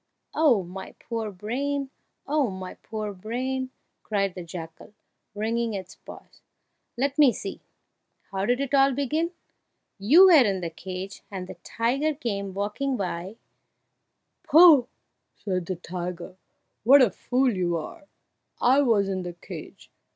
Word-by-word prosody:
"Oh, 270 -11 +3
my 185 +2 -9
poor 225 -2 -4
brain! 265 +8 -3 0.3
oh, 290 -3 +1
my 185 -1 -7
poor 215 -2 -6
brain!" 255 +6 -3 0.3
cried 195 -3 -1
the 180 - -7
jackal, 165 +3 -9 0.4
wringing 225 +1 -1
its 185 -2 -7
paws. - - -14 0.6
"Let 275 +3 -1
me 285 -4 +7
see! - - -7 0.7
how 195 +1 -2
did 245 +1 +2
it 280 0 -3
all 275 0 +5
begin? 305 +5 0 0.7
You 295 - +7
were 330 -8 +8
in 195 -4 0
the 170 -1 -4
cage, 185 +3 -7
and 190 -2 -5
the 185 - -8
tiger 270 +7 0
came 200 -8 -4
walking 230 +7 -2
by 185 +1 -4 0.5
" - - -53
"Pooh!" 310 -6 +8 0.6
interrupted 185 -3 -1
the 185 - -2
tiger, 175 0 -6 0.5
"what 265 +4 +8
a 225 - +3
fool 250 +5 +1
you 175 -2 0
are! 295 - -8 0.5
I 265 +4 +4
was 220 -7 +3
in 190 -1 -2
the 175 -1 -6
cage." 170 - -11
215 Hz, 145 wpm, -26 LUFS, 185-270 Hz, 0.7 s, were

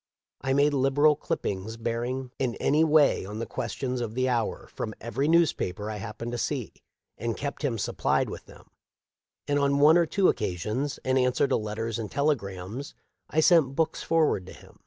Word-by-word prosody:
I 135 - 0
made 145 +2 +3
liberal 145 +3 +4
clip - - -3
pings 100 +4 -4
bearing 120 +3 -3
in 125 -3 0
any 150 +3 +2
way 155 -2 +4
on 105 +3 -7
the 115 - -3
questions 125 +1 -3
of 115 -2 -4
the 130 0 +1
hour 120 -3 -1
from 110 - -4
every 135 +5 -2
newspaper 120 - +1
I 105 - -5
happened 115 +3 -6
to 120 - -3
see, 130 -6 -2 0.5
and 115 +1 -2
kept 140 0 -4
him 135 -6 -1
supplied - - 0
with - - -8
them; - - -17 0.8
and 145 0 +2
on 140 0 +2
one 155 +4 +6
or 170 - +2
two 195 +3 +2
occasions, 110 - -1
in 130 0 +2
answer 125 +2 +2
to - - +1
letters 110 +1 -3
and 110 -2 -4
telegrams, 120 -4 -2 0.3
I 155 - +2
sent 155 -5 +4
books 160 +1 0
forward 155 - +1
to - - -9
him. - - -17
130 Hz, 185 wpm, -27 LUFS, 110-145 Hz, 0.8 s, one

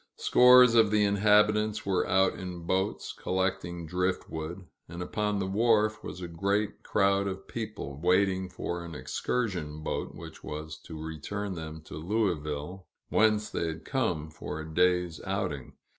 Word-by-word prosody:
Scores 125 -1 +7
of 115 -2 +6
the 105 0 +3
inhabitants 105 +1 +3
were 95 -2 +1
out 95 0 +3
in 90 -2 -7
boats, 95 +3 -1
collecting 90 -2 -2
driftwood; 90 0 -3 0.2
and 85 +1 -7
upon 105 +3 -1
the 95 - -1
wharf 110 +1 +2
was 90 - -7
a 90 - -4
great 100 +5 -1
crowd 100 0 +2
of 95 0 -5
people, 105 -11 -6
waiting 95 +1 +2
for 85 -1 -4
an 85 -2 -8
excursion 90 -9 -2
boat - - -3
which - - -10
was 75 0 -6
to 80 -2 -8
return 95 +6 -4
them 80 -2 -7
to 75 - -9
Louisville, 90 -2 -2 0.2
whence 105 -1 +3
they 85 - -1
had 80 -1 -6
come 90 - -1
for 80 0 -6
a 80 - -6
day's 90 0 +1
outing. 90 -9 -3
95 Hz, 150 wpm, -29 LUFS, 80-105 Hz, 0.2 s, Scores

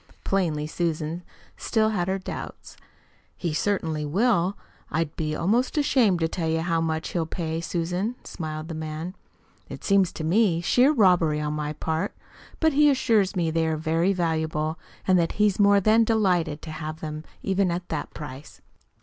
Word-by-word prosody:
Plainly 165 -6 0
Susan 160 +1 -2 0.4
still 220 -2 +1
had 185 -5 -1
her 190 +1 0
doubts. 190 - -8 0.6
"He 170 -4 -2
certainly 160 -4 -1
will. 190 +3 +1 0.3
I'd 160 0 -2
be 155 -1 -2
almost 230 - +1
ashamed 245 - +3
to 165 - +3
tell 165 -1 -2
you 160 0 +1
HOW 165 -1 0
much 160 0 -2
he'll 165 -2 -1
pay, 165 -1 -3
Susan," 180 +7 -2
smiled 155 -1 -6
the 165 - -5
man. 155 +2 -5 0.6
"It - - -8
seemed 195 -2 +4
to 160 - -4
me 175 +1 +3
sheer 250 - +4
robbery 180 - +3
on 150 0 -2
my 150 0 -3
part. 160 +5 -2 0.4
But 320 -2 +3
he 295 +1 +5
assures 225 -7 +2
me 170 -3 +1
they 160 0 +1
are 160 -1 0
very 165 +4 +1
valuable, 160 -3 -1 0.3
and 185 -1 +5
that 165 -1 0
he's 210 -2 +2
more 200 0 +6
than 215 +3 +4
delighted 180 -9 +1
to 160 - -6
have 155 0 -6
them 155 -1 -5 0.2
even 190 -1 +1
at 175 +1 -3
that 155 - -3
price." 145 -1 -9
170 Hz, 170 wpm, -25 LUFS, 160-200 Hz, 0.6 s, more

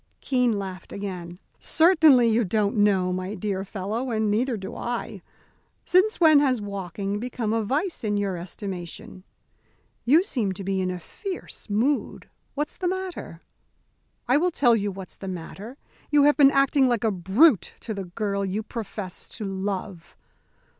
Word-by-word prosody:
Keene 250 -5 +1
laughed 190 -2 -7
again. 180 -4 -6 0.2
"Certainly 315 -7 +5
you 225 +2 +3
don't 210 +2 0
know, 195 -3 +3
my 185 +3 -4
dear 195 -1 -2
fellow; 210 +6 -4
and 220 -2 0
neither 235 +3 0
do 190 -1 -7
I. 240 -1 -4 0.6
Since 375 +5 +3
when 315 -4 +7
has 265 -4 +2
walking 200 0 -4
become 230 -2 -2
a 225 - +1
vice 300 - -1
in 205 -1 0
your 200 -2 -1
estimation? 180 0 -7 0.8
You 305 +9 +5
seem 230 - -1
to 195 - -8
be 190 0 -1
in 185 - -1
a 180 -1 -4
fierce 375 - -8
mood. 245 +8 0 0.3
What's 295 +2 -3
the 365 - -1
matter?" 375 0 -4 0.9
"I 255 +3 +4
will 355 +4 +2
tell 250 -8 +3
you 205 -2 -1
what's 190 -1 -10
the 195 - -8
matter. 190 +7 -7 0.3
You 295 -1 +5
have 295 +1 +5
been 280 -2 +7
acting 275 -1 +3
like 240 -3 0
a 220 - +2
brute 195 - +3
to 220 - -4
the 195 -2 -5
girl 200 +2 -2
you 195 +3 -2
profess 210 -4 -7
to 215 - -4
love." 195 -2 -5
210 Hz, 160 wpm, -25 LUFS, 195-265 Hz, 0.9 s, when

